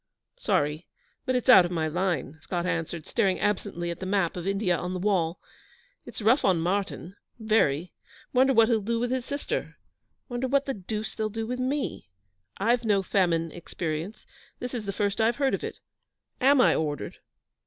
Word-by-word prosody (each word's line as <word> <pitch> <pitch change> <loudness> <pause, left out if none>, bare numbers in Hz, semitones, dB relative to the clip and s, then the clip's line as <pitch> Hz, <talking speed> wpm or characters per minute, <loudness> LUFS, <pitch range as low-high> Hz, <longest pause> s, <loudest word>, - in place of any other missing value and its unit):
'Sorry, 150 +3 0 0.4
but 255 - +1
it's 250 - -1
out 220 -8 +9
of 175 - -2
my 165 -3 -1
line,' 165 -4 -1
Scott 175 -1 -3
answered, 165 -2 -2
staring 195 -6 +1
absently 195 -4 -1
at 170 - -7
the 190 - -5
map 190 -4 +1
of 180 +1 -5
India 195 -2 +1
on 180 +2 -3
the - - -3
wall. 180 -4 +1 0.7
'It's - - -7
rough 235 +7 +4
on 185 -4 +3
Martyn 185 +1 -2 0.2
very. 185 -8 +1 0.4
Wonder 265 +1 +5
what 230 -3 +5
he'll 225 -2 +2
do 230 +3 -1
with 245 +1 -1
his 255 -2 -1
sister. 285 +1 -4 0.5
Wonder 245 0 -2
what 280 +2 +2
the 270 - -2
deuce 215 +1 -4
they'll 215 -1 -2
do 225 +1 -4
with 250 +2 -4
me? 260 - -2 0.5
I've 235 +4 +2
no 205 -3 +2
famine 170 -4 +1
experience. 170 +2 -5 0.3
This 250 0 -6
is 230 -4 -4
the 200 - -2
first 200 +1 -1
I've 230 +2 +3
heard 275 -1 +1
of - - -2
it. - - -5 0.6
Am 275 +2 +5
I - - +5
ordered?' 150 -2 -3
200 Hz, 185 wpm, -27 LUFS, 175-235 Hz, 0.7 s, out